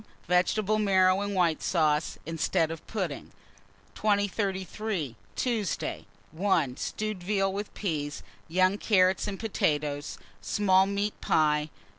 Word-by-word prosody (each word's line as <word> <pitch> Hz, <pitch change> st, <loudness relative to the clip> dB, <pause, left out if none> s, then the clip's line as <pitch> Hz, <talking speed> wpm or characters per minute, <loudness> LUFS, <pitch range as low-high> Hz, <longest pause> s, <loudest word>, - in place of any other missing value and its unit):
Vegetable 205 Hz, +4 st, +2 dB
marrow 190 Hz, -2 st, +4 dB
and 205 Hz, 0 st, -2 dB
white 170 Hz, -4 st, +2 dB
sauce, 155 Hz, -3 st, +1 dB
instead 165 Hz, 0 st, 0 dB
of 165 Hz, -, -8 dB
pudding. 185 Hz, -10 st, -4 dB, 0.6 s
2033. 200 Hz, -, -1 dB, 0.2 s
Tuesday. 225 Hz, -7 st, -2 dB, 0.2 s
1. 160 Hz, -6 st, +1 dB
Stewed 215 Hz, -3 st, -3 dB
veal, 195 Hz, +1 st, 0 dB
with 205 Hz, +1 st, -4 dB
peas, 150 Hz, -7 st, -3 dB, 0.2 s
young 185 Hz, +4 st, +2 dB
carrots, 190 Hz, -2 st, +3 dB
and 195 Hz, -2 st, -4 dB
potatoes. 150 Hz, -9 st, -1 dB, 0.2 s
Small 190 Hz, -, +3 dB
meat 200 Hz, +1 st, -2 dB
pie. 150 Hz, -1 st, +2 dB
185 Hz, 110 wpm, -28 LUFS, 160-205 Hz, 0.6 s, marrow